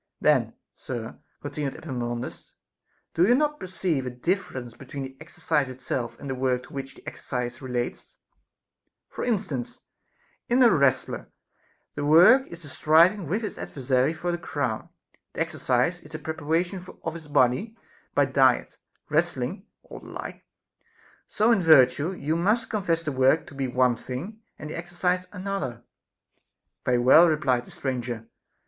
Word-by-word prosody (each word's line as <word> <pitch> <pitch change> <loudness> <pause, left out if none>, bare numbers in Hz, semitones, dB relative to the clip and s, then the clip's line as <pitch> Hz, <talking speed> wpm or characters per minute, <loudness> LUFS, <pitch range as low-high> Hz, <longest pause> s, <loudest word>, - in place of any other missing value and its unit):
Then, - - +2 0.2
sir, 120 -3 -6 0.2
continued 145 -1 -3
Epaminondas, 120 -1 -5 0.6
do 175 +3 +4
you 245 - +6
not 300 +2 +1
perceive 180 -6 -1
a 125 - -3
differ 170 +7 -2
ence 120 -2 -7
between 135 +2 -7
the 135 0 -8
exercise 150 -3 -1
itself 130 -1 -4
and - - -8
the 135 - -2
work 125 -1 0
to - - -15
which 135 0 -6
the - - -18
exercise 125 -1 -4
relates 125 -2 -4 0.5
\ - - -56
For - - -5
instance, 190 - -2 0.7
in 250 +2 +5
a 235 - +7
wrestler, 140 -3 +1 0.6
the 145 - -4
work 175 - +7
is 170 0 -10
the - - -8
striving 165 +6 +4
with 205 +9 -1
his 210 - -5
adversary 130 +1 0
for 175 +2 -3
the 175 - -2
crown, 140 -9 -3 0.4
the - - -3
exercise 130 +9 0
is 150 - -16
the 155 - -6
preparation 160 +4 -2 0.2
of 165 - -3
his 165 -2 -9
body 145 - +2 0.4
by - - +5
diet, - - +2 0.3
wrestling, - - -1 0.2
or - - -10
the - - -14
like. - - -8 0.8
So 220 +3 +2
in 225 -5 +4
virtue, 145 0 +5
you 155 -3 -2
must 210 +7 +1
confess 175 -6 0
the 155 - -2
work 130 +4 +3
to - - -13
be 135 -1 -2
one 125 -1 +2
thing 175 - -7 0.2
and 150 - -7
the - - -5
exercise 180 +2 -1
another. 185 - -4 1.0
Very 125 -1 +3
well, 130 +8 +7
replied 130 -5 +1
the - - -15
stranger. 120 -4 -4
150 Hz, 155 wpm, -26 LUFS, 130-180 Hz, 1.0 s, a